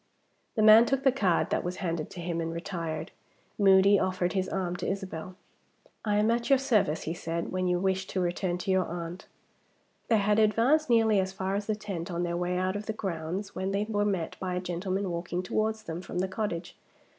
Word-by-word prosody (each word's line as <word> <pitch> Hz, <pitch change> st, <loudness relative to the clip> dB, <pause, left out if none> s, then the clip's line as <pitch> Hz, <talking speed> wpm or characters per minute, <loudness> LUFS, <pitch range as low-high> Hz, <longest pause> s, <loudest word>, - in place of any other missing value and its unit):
The 215 Hz, -, +2 dB
man 220 Hz, +2 st, +8 dB
took 270 Hz, 0 st, 0 dB
the 265 Hz, -, +5 dB
card 195 Hz, -10 st, +1 dB
that -, -, +1 dB
was 180 Hz, +1 st, -3 dB
handed 165 Hz, -4 st, -3 dB
to 175 Hz, -, -8 dB
him 170 Hz, -1 st, -2 dB
and 165 Hz, 0 st, -3 dB
retired. 170 Hz, -2 st, -4 dB, 0.5 s
Moody 195 Hz, 0 st, +6 dB
offered 185 Hz, -1 st, 0 dB
his 190 Hz, -2 st, -1 dB
arm 180 Hz, -2 st, -2 dB
to -, -, -4 dB
Isabel. 185 Hz, -2 st, -4 dB, 0.7 s
"I 210 Hz, -1 st, +1 dB
am 215 Hz, +2 st, +3 dB
at 235 Hz, +2 st, -1 dB
your 275 Hz, -, +6 dB
service," 220 Hz, -, +1 dB
he 160 Hz, -, -3 dB
said, 170 Hz, 0 st, -4 dB
"when 185 Hz, 0 st, -1 dB
you 180 Hz, 0 st, +2 dB
wish 190 Hz, +1 st, 0 dB
to 190 Hz, -, -2 dB
return 175 Hz, 0 st, -1 dB
to 185 Hz, +2 st, -2 dB
your 185 Hz, -1 st, +2 dB
aunt." 170 Hz, +1 st, -6 dB, 0.8 s
They 225 Hz, -, +4 dB
had 210 Hz, +1 st, +2 dB
advanced 235 Hz, +8 st, +3 dB
nearly 225 Hz, -3 st, +4 dB
as 190 Hz, 0 st, -1 dB
far 190 Hz, 0 st, -2 dB
as 205 Hz, +1 st, -2 dB
the 215 Hz, -, +1 dB
tent, 195 Hz, -4 st, -5 dB
on 175 Hz, 0 st, -2 dB
their 170 Hz, 0 st, -1 dB
way 180 Hz, +1 st, -1 dB
out 185 Hz, +1 st, 0 dB
of 205 Hz, +1 st, -5 dB
the 220 Hz, -, -1 dB
grounds, 185 Hz, 0 st, -4 dB
when 190 Hz, +1 st, -2 dB
they 200 Hz, +1 st, 0 dB
were 205 Hz, -2 st, 0 dB
met 190 Hz, -5 st, -1 dB
by 185 Hz, -1 st, -2 dB
a -, -, 0 dB
gentleman 185 Hz, +2 st, -2 dB
walking 175 Hz, +1 st, -3 dB
towards 215 Hz, +3 st, -1 dB
them 170 Hz, -2 st, -5 dB
from 180 Hz, -, -7 dB
the 185 Hz, +1 st, +1 dB
cottage. 190 Hz, -3 st, -4 dB
190 Hz, 215 wpm, -29 LUFS, 175-210 Hz, 0.8 s, man